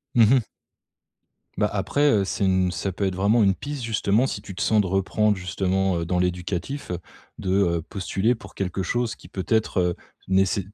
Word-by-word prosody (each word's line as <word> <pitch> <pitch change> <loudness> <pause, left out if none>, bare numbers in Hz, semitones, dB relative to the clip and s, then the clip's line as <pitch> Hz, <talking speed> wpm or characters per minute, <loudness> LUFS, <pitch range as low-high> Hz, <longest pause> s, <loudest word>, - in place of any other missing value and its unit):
Mmh 120 - +7
mh. 130 - +4 1.2
Bah 105 - +2
après, 105 +9 +1
heu, 105 -3 +3
c'est 95 +1 -1
une 95 -1 +2
ça 95 +1 -2
peut 100 - -3
être 95 -1 -1
vraiment 105 +5 +3
une 95 -1 +3
piste 145 +1 -6
justement, 110 +1 +2
si 100 - -3
tu 100 -2 -9
te 100 - -5
sens 110 - +3
de 100 - -2
reprendre 95 +3 +1
justement, 95 0 0
heu, 85 - -2
dans 90 +1 0
l'éducatif, 90 +8 -2
heu, 90 - -2 0.4
de, 95 - -2
heu, 90 -4 +2
postuler 100 +6 -1
pour 95 -4 -14
quelque 95 0 -2
chose 120 +4 -1
qui - - -15
peut-être, 105 +1 0
heu, 90 -1 +1 0.3
néce 95 +1 +3
95 Hz, 195 wpm, -24 LUFS, 95-110 Hz, 1.2 s, Mmh